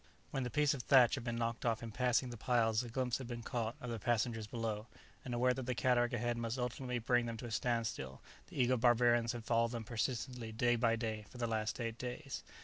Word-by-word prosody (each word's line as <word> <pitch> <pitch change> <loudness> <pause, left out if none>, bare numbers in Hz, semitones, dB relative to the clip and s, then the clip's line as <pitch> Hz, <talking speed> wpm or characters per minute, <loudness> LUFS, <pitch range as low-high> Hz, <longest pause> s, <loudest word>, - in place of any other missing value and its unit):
When 135 - -1
the 125 - -2
piece 150 +1 +3
of 135 - -4
thatch 125 -1 +6
had 130 - -2
been 120 -1 -2
knocked 115 0 -2
off 115 -1 0
in 115 - -5
passing 125 +1 +1
the - - -6
piles 115 -1 +2
a 120 - -6
glimpse 125 +1 -1
had 130 - -6
been 120 -1 -5
caught 115 -1 -2
of 125 -5 -5
the 115 - -3
passengers 115 0 0
below, 110 -1 -3 0.4
and 125 - -6
aware 125 +1 +3
that 130 0 -5
the 125 - 0
cataract 120 -1 +2
ahead 120 0 -1
must 115 +1 -2
ultimately 125 0 -2
bring 120 +1 +2
them 115 -1 -4
to 115 - -7
a 120 - -6
standstill, 110 - -1 0.3
the - - -7
eager 125 0 +4
barbarians 120 0 +4
had 120 -2 -7
followed 115 0 +2
them 115 -1 -3
persistently 120 +1 -3
day 120 +2 +2
by 115 -1 +3
day 110 -2 -3
for - - -12
the 120 - -1
last 110 0 -1
eight 115 -1 -3
days. 125 +3 -5
120 Hz, 235 wpm, -36 LUFS, 115-125 Hz, 0.4 s, thatch